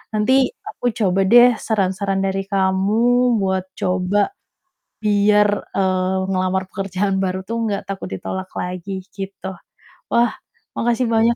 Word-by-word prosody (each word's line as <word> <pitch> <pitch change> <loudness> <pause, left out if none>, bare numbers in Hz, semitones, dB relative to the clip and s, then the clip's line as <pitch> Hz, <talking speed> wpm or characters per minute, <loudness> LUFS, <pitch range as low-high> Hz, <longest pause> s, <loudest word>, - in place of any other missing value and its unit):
Nanti, 260 +5 +3 0.2
aku 245 - -9
coba 195 -2 +2
deh 240 0 +8
saran-saran 195 -2 0
dari 195 0 -1
kamu 215 +6 +2
buat 190 -1 0
coba 185 - +1 0.7
biar, 210 0 +4 0.3
eee, 185 -1 +1
ngelamar 185 0 0
pekerjaan 195 0 -1
baru 185 0 -2
tuh 230 - -2
nggak 200 -1 -2
takut 195 -1 -5
ditolak 190 - -5
lagi, 185 +1 -5
gitu. 195 -1 -6 0.6
Wah, 235 +1 +3 0.5
makasih 240 +1 +1
banyak 230 +1 +3
195 Hz, 120 wpm, -20 LUFS, 190-220 Hz, 0.7 s, deh